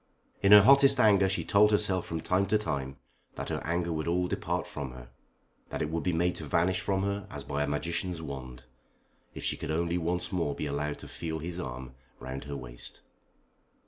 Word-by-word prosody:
In 100 - +4
her 105 -1 +11
hottest 140 +2 +6
anger 100 -4 +5
she 95 - -1
told 105 +1 +5
herself 105 -3 +1
from 80 -1 -3
time 95 +4 +1
to 110 - +3
time 70 -10 -3 0.4
that - - -5
her - - -2
anger 85 +1 -1
would 80 0 -3
all 90 +1 +1
depart - - -2
from 65 -3 -6
her, - - -11 0.6
that - - -2
it 75 - -3
would 85 0 -1
be 90 - 0
made 90 +1 +1
to - - -6
vanish 90 +2 +1
from 95 -1 0
her 100 +1 -2
as 70 -1 -7
by 70 - -2
a 75 - 0
magician's 85 +4 -2
wand, 65 -5 -7 0.7
if - - -7
she - - 0
could - - -6
only 85 +2 0
once 90 +3 -2
more 85 -6 -1
be - - -3
allowed 75 +1 -2
to - - -10
feel 80 -1 -4
his 85 +3 -5
arm 65 -4 -6 0.3
round 65 +2 -6
her 70 0 -5
waist. - - -9
85 Hz, 210 wpm, -29 LUFS, 70-95 Hz, 0.7 s, her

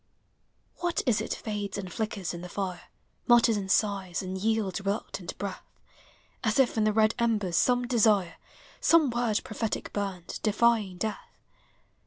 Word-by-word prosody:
What 345 -1 -1
is 225 -5 +2
it - - -5
fades 205 -2 -4
and 190 -3 -6
flickers 210 -5 -3
in 170 - -6
the 180 - -8
fire, 185 -2 -4 0.4
Mutters 240 -1 +6
and 195 -2 -3
sighs, 195 -4 +1
and 185 0 -4
yields 210 -1 0
reluctant 200 -2 -4
breath, 200 -2 -5 0.8
As - - +1
if 265 -3 +3
in 220 -1 +2
the 215 - +3
red 215 +1 +3
embers 210 -7 +1
some 245 +5 +3
desire, 215 -7 +2 0.4
Some 320 -6 +4
word 235 -3 0
prophetic 220 0 -4
burned, 195 -4 -4
defying 215 -3 +2
death? 215 +3 -5
210 Hz, 150 wpm, -28 LUFS, 190-230 Hz, 0.8 s, Mutters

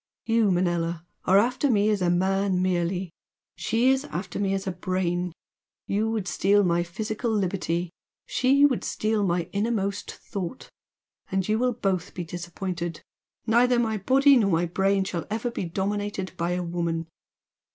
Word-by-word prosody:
You, 225 -2 +3
Manella, 175 -2 0 0.2
are 190 - +5
after 250 +6 +2
me 210 -2 +3
as 205 -2 0
a 180 - +2
man 190 +1 +1
merely 180 0 0 0.4
she 240 +3 +2
is 265 +1 +1
after 180 -5 -5
me 195 -1 +1
as 195 - -3
a 190 - -1
Brain! 180 0 -1 0.5
You 215 +3 0
would 220 -4 -2
steal 205 +1 +3
my 175 -2 +2
physical 215 +7 -3
liberty, 180 -4 -1 0.3
she 275 +3 +4
would 265 -5 +1
steal 215 -1 0
my 175 -2 +1
innermost 200 -1 -1
thought! 200 +3 -6 0.6
And 190 -1 0
you 215 +1 +1
will 250 0 +2
both 195 -6 -2
be 180 - -3
disappointed! 175 0 -5 0.4
Neither 240 +2 +4
my 225 -2 +1
body 270 +7 +5
nor 210 -4 +3
my 170 -1 +2
brain 195 +3 +1
shall 175 -3 -4
ever 225 +3 -2
be 195 - -3
dominated 195 +2 -2
by 170 +1 -1
any 180 - -1
woman!" 170 -1 -2
195 Hz, 160 wpm, -26 LUFS, 175-220 Hz, 0.6 s, are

